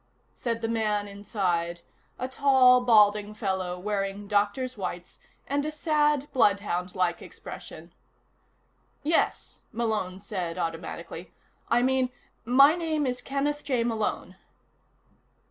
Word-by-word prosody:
said 230 -2 -3
the 225 - -1
man 215 -2 0
inside, 185 -4 -2 0.4
a 255 - -3
tall, 260 -2 +5
balding 210 -3 +4
fellow 190 -4 -2
wearing 200 +1 -3
doctor's 210 +5 0
whites 180 -3 -6 0.3
and 285 +1 -1
a 305 - -2
sad, 295 -1 +1
bloodhound 200 -6 +1
like 180 -2 0
expression. - - -10 1.1
"Yes," 320 +3 0
Malone 215 -5 -2
said 185 -5 -4
automatically. 165 0 -5 0.3
"I 240 +1 +3
mean 260 0 +2 0.4
my 275 +5 +7
name 320 -4 -1
is 250 -1 -2
Kenneth 290 +2 -2
J. 255 -5 0
Malone." 225 -2 -2
220 Hz, 110 wpm, -27 LUFS, 190-260 Hz, 1.1 s, my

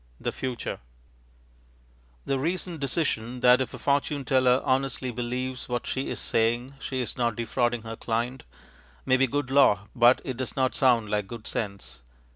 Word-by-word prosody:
The - - -2
Future 130 -2 -4 1.5
The 135 - 0
recent 170 +2 -2
decision 125 -4 -1
that, 125 +1 +6
if 130 - -2
a - - -7
fortune 140 0 0
teller 130 -1 +4
honestly 130 -1 0
believes 125 +2 -4
what 120 -1 -2
she 135 +1 -2
is - - -4
saying, 120 +4 0
she 130 -1 -3
is 120 - -4
not 120 -3 +1
defrauding 120 0 0
her 115 0 -6
client, 120 +3 -2 0.6
may 130 - +4
be 135 +1 +3
good 140 +1 -2
law, 105 -7 +4
but 120 +1 +6
it 130 -3 -4
does 130 -2 -4
not 130 -1 +1
sound 120 -5 +3
like 105 -2 0
good 115 +1 -8
sense. 100 - -5
125 Hz, 165 wpm, -27 LUFS, 120-135 Hz, 1.5 s, that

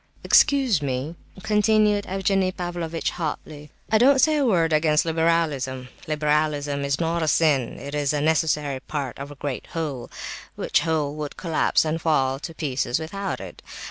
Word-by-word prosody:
"Excuse 270 - +4
me," 140 +3 -3 0.3
continued 210 -1 +2
Evgenie 195 0 +1
Pavlovitch 175 -3 -3
hotly, 150 -2 -5 0.2
"I 220 - +5
don't 270 +4 +6
say 305 +3 +4
a 285 - +2
word 165 -7 +2
against 155 0 +3
liberalism. 160 -6 0 0.2
Liberalism 150 -2 0
is 140 0 -1
not 165 0 0
a 160 - 0
sin, 150 -6 +2
it 140 +1 -8
is 145 -2 0
a 150 - 0
necessary 150 -3 +1
part 140 -3 -5
of 140 +1 -6
a 145 - -10
great 140 -2 -5
whole, 150 -7 -4 0.5
which - - +1
whole 155 -3 -1
would 150 -1 -5
collapse 165 -2 +1
and 160 +1 -2
fall 135 -5 +1
to 165 +2 -8
pieces 130 -5 -1
without 195 +5 -4
it. - - -10
155 Hz, 160 wpm, -24 LUFS, 145-175 Hz, 0.5 s, don't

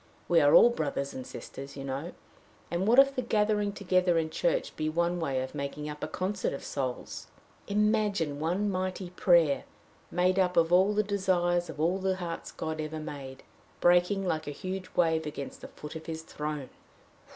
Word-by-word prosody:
We 170 - +5
are 145 0 +6
all 240 - +8
brothers 140 -7 -2
and 130 - -7
sisters, 135 +1 -9
you 135 - -5
know 140 +6 -4 0.6
and 175 +3 0
what 235 +3 +5
if 275 0 +7
the 255 - 0
gathering 210 -3 +1
together 185 -3 +2
in 160 -1 0
church - - 0
be 155 0 -1
one 170 +2 0
way 135 -5 -1
of 130 - -7
making 150 +1 -4
up 150 0 -7
a - - -1
concert 190 +1 -2
of 140 - -6
souls? 130 -3 -4 0.4
Imagine 205 -7 +1
one 180 +7 0
mighty 185 -1 -3
prayer, 170 -6 +4 0.5
made 185 +2 +2
up 180 -2 +2
of 165 +1 +4
all 190 +3 +5
the 210 - +3
desires 180 -3 +1
of - - -8
all 175 +5 +1
the 190 0 0
hearts 170 -2 -5
God 160 0 -4
ever 155 +1 -4
made, 135 -3 -8 0.4
breaking 180 +3 +3
like 160 -3 -1
a 145 -1 -5
huge 185 0 -5
wave 160 -2 +2
against 140 -2 -6
the - - -7
foot 150 +1 -10
of 160 0 -8
his 160 -1 -5
throne!" 150 -4 -5
175 Hz, 185 wpm, -29 LUFS, 150-190 Hz, 0.6 s, all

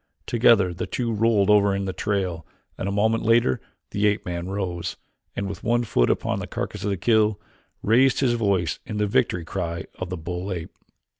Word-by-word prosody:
Together 110 -6 +4
the 85 - -4
two 120 -2 -2
rolled 105 -2 +3
over 100 -1 +4
in 100 0 -2
the 95 - -3
trail 95 -6 -2 0.3
and 95 - -3
a - - -1
moment 110 +3 +2
later 115 - +3 0.3
the 105 +1 +2
ape 105 +1 0
man 85 0 -4
rose, 90 -3 -3 0.4
and, 100 - -2
with 95 -2 -7
one 120 +1 +2
foot - - +2
upon - - 0
the - - -5
carcass 105 -2 -5
of 105 - 0
his 100 -2 -2
kill, 110 -2 +3 0.4
raised 125 +4 +4
his 130 -3 +2
voice 100 -7 0
in 105 - -5
the 105 - +2
victory 90 -4 +1
cry 85 -2 -3
of 95 - -4
the 90 - -4
bull 90 +4 -5
ape. 85 -2 -5
100 Hz, 200 wpm, -24 LUFS, 90-110 Hz, 0.4 s, Together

